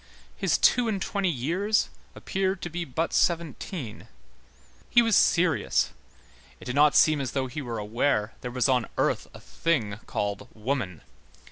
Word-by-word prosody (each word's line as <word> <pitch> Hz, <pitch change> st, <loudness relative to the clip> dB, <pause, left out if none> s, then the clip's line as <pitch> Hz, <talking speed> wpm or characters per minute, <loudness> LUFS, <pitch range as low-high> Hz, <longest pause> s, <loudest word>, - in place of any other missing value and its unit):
His -, -, +1 dB
two 245 Hz, -2 st, +4 dB
and 210 Hz, -3 st, -1 dB
twenty 195 Hz, -1 st, -1 dB
years 175 Hz, -, 0 dB, 0.3 s
appeared 190 Hz, 0 st, -2 dB
to 175 Hz, -, -4 dB
be 170 Hz, +1 st, -3 dB
but 160 Hz, +4 st, -2 dB
seventeen; 165 Hz, -, -1 dB, 0.8 s
he 240 Hz, -, +5 dB
was 225 Hz, -3 st, +3 dB
serious, 165 Hz, -3 st, +3 dB, 0.7 s
it -, -, -12 dB
did 125 Hz, -, -3 dB
not 145 Hz, +1 st, +5 dB
seem 155 Hz, -2 st, +5 dB
as 130 Hz, -, -4 dB
though 135 Hz, -1 st, 0 dB
he 130 Hz, +4 st, -5 dB
were 120 Hz, -4 st, -4 dB
aware 105 Hz, +1 st, 0 dB
there 125 Hz, -, -4 dB
was 125 Hz, +1 st, +1 dB
on 125 Hz, -3 st, +2 dB
earth -, -, 0 dB
a -, -, -10 dB
thing 115 Hz, -11 st, -1 dB
called 100 Hz, -1 st, -3 dB
woman. 110 Hz, -, -3 dB
145 Hz, 155 wpm, -27 LUFS, 120-175 Hz, 0.8 s, he